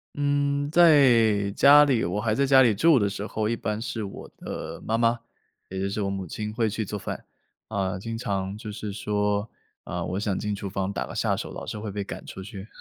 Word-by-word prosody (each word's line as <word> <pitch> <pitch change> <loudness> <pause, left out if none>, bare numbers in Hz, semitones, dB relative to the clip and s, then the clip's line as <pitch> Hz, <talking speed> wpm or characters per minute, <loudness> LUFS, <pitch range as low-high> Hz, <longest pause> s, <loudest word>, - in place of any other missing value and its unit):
嗯， 145 0 0
在 120 -11 +5
家 145 +7 +7
里 130 -5 +2
我 90 +5 -1
还 110 0 0
在 140 - +2
家 135 -1 +6
里 120 -4 +5
住 155 +5 +5
的 100 - +2
时 100 +1 -5
候， 110 0 -2
一 115 - 0
般 105 -1 -3
是 115 -2 -4
我 100 - -8
的 - - -6
妈 115 +1 0
妈， 115 0 +2 0.5
也 95 - -5
就 95 +1 -1
是 105 - -3
我 100 - -1
母 95 -1 -4
亲 105 +5 -5
会 115 -1 +1
去 110 +2 -2
做 105 0 -5
饭。 95 - -6 0.5
啊， 95 -3 -1
经 115 +4 -5
常 100 -3 -3
就 110 - -8
是 105 0 -5
说， 105 +1 -1 0.4
啊， - - -4
我 90 +2 -3
想 100 -2 -1
进 105 -1 -2
厨 100 -1 -5
房 95 0 -2
打 - - -3
个 - - -8
下 - - +1
手， - - -5
老 - - -7
是 105 - -5
会 105 0 -5
被 100 0 -3
赶 - - -8
出 95 - -8
去。 100 +1 -9
105 Hz, 250 characters per minute, -26 LUFS, 100-120 Hz, 0.5 s, 家